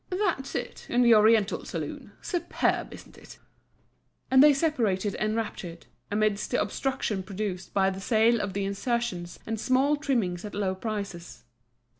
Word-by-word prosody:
"That's 365 -8 -1
it, 245 - -5
in 245 +1 +3
the 235 -1 +7
oriental 215 -1 +4
saloon—Superb, 345 -2 -3
isn't - - -13
it?" - - -14 0.9
And 260 0 +7
they 295 +1 +8
separated 230 - 0
enraptured, 215 -6 -3 0.2
amidst 210 0 0
the 250 - +1
obstruction 260 -7 -1
produced 190 -1 -5
by 195 -1 +2
the 190 0 -7
sale 225 +2 +3
of 200 -2 -3
the 200 0 -1
insertions 200 -3 -2
and 225 -1 -3
small 265 +5 +2
trimmings 235 - -1
at 210 - -7
low 195 -2 0
prices. 190 - -6
215 Hz, 140 wpm, -27 LUFS, 195-250 Hz, 0.9 s, they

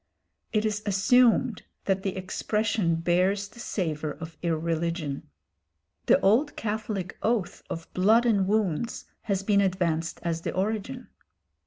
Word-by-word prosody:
It 215 0 +1
is 210 -1 -1
assumed 230 +3 +4 0.2
that 195 -1 +1
the 195 0 -3
expression 205 -1 0
bears 185 +4 +1
the 215 +4 -16
savour 155 -9 -2
of 160 0 -9
irreligion. 165 - -2 0.8
The - - +6
old 245 +10 +3
Catholic 210 -4 -3
oath 220 -5 0
of 165 0 -5
"blood 220 +6 +4
and 200 -5 +3
wounds" 210 -1 0 0.2
has 195 -3 -1
been 200 0 +3
advanced 170 -4 0
as 165 -1 -1
the - - -4
origin. 220 +6 -2
195 Hz, 130 wpm, -27 LUFS, 170-215 Hz, 0.8 s, The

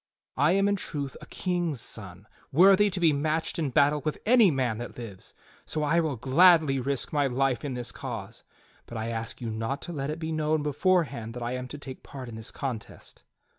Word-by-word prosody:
I 145 +6 +4
am 195 +1 +3
in 200 0 +2
truth 145 -7 -4
a - - -11
king's 175 -7 -2
son, 100 -4 -7 0.3
worthy 195 +6 +6
to 185 - -2
be 165 -3 +4
matched 155 +4 -1
in 155 -4 0
battle 145 +2 +3
with 155 - -2
any 230 -3 +6
man 125 -7 0
that 120 - -7
lives; 110 -6 -9 0.3
so 155 - -3
I 165 +3 +3
will 155 -4 0
gladly 145 +3 +5
risk 135 +2 -1
my 145 -2 +2
life 130 0 0
in 140 -3 -3
this 125 -1 -3
cause. 115 -5 -7 0.4
But 120 - -7
I 110 +1 -3
ask 115 0 -4
jmu 115 -2 -4
not 115 +5 -2
to 175 - -6
let 140 -2 -3
it 155 - -3
be 160 -1 -4
known 155 -1 0
beforehand 145 - 0
that 125 - -5
I 120 - -2
am 125 0 -4
to 145 - -8
take 135 -2 -9
part 130 -3 -9
in 115 - -8
this 110 0 -6
contest." 130 -6 -6
140 Hz, 210 wpm, -27 LUFS, 120-160 Hz, 0.4 s, worthy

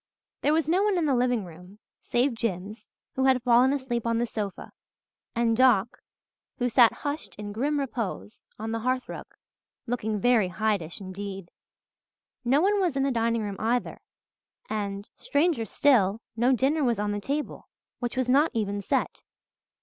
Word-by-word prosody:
There 295 - +2
was 320 -2 +1
no 355 +4 +3
one 410 -2 +2
in 335 - +1
the 285 - +2
living 245 -4 +1
room, 180 +4 -13 0.2
save 245 +2 +1
Jims, 210 -1 -4 0.2
who 265 - 0
had 260 -2 +3
fallen 250 +2 +5
asleep 260 -4 -2
on 230 0 +1
the 240 - +1
sofa, 210 -4 -5 0.6
and 230 -1 +2
Doc, 240 -3 +3 0.6
who 245 -1 0
sat 235 -1 +6
"hushed 290 +1 -5
in 205 0 -7
grim 285 +8 0
repose" 210 - -4
on 220 +1 -4
the 225 - -1
hearth 255 +2 -1
rug, - - -7 0.6
looking 220 -3 -2
very 230 -2 +3
Hydeish 180 -2 -1
indeed. 195 -1 -7 0.9
No 265 +5 +3
one 405 +3 +3
was 355 -7 +1
in 270 - +1
the 275 - +1
dining 230 -1 0
room 200 -2 -4
either 240 +3 -1 0.7
and, 200 -1 -4
stranger 285 -5 0
still, 220 -4 +3 0.2
no 240 +3 +3
dinner 275 +5 +2
was 240 -4 +2
on 205 0 -1
the 205 0 -3
table, 285 +7 -4 0.3
which 240 +1 -4
was 255 -1 +1
not 285 +5 +4
even 205 -2 -1
set. 200 - -1
235 Hz, 165 wpm, -27 LUFS, 205-265 Hz, 0.9 s, sat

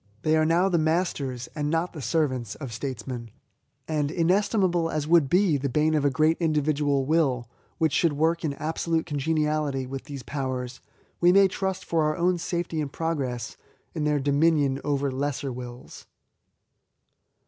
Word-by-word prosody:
They 155 0 +3
are 155 0 +3
now 175 +3 +3
the 175 -3 +2
masters, 155 -6 -1
and 150 -2 -2
not 165 +3 0
the 155 - -7
servants, 130 - -1
of 135 -6 -7
Statesmen; 120 -1 -5 0.6
and 150 -2 0
inestimable 175 0 +2
as 150 -2 -2
would 165 -4 +4
be 180 -3 +3
the 140 0 -2
boon 155 +4 +2
of 150 -2 +2
a 145 - +4
great 155 +3 +2
individual 150 -3 +1
will, 135 -6 +1 0.3
which 160 -4 +1
should 165 +1 +2
work 165 +4 +1
in 150 -3 -1
absolute 160 +2 -1
congeniality 150 -2 0
with 135 0 -6
these 140 -3 -7
powers, 130 -1 -4 0.4
we 175 0 +5
may 195 +1 +6
trust, 190 0 -3
for 155 -2 +1
our 180 +1 +2
safety 170 -2 -2
and 145 -2 -4
progress, 135 -8 -3 0.4
in 155 - -2
their 150 -1 +2
dominion 140 -1 +2
over 140 -1 0
all 130 - -6
lesser 140 -1 -2
wills. 125 0 -9
150 Hz, 160 wpm, -26 LUFS, 135-165 Hz, 0.6 s, may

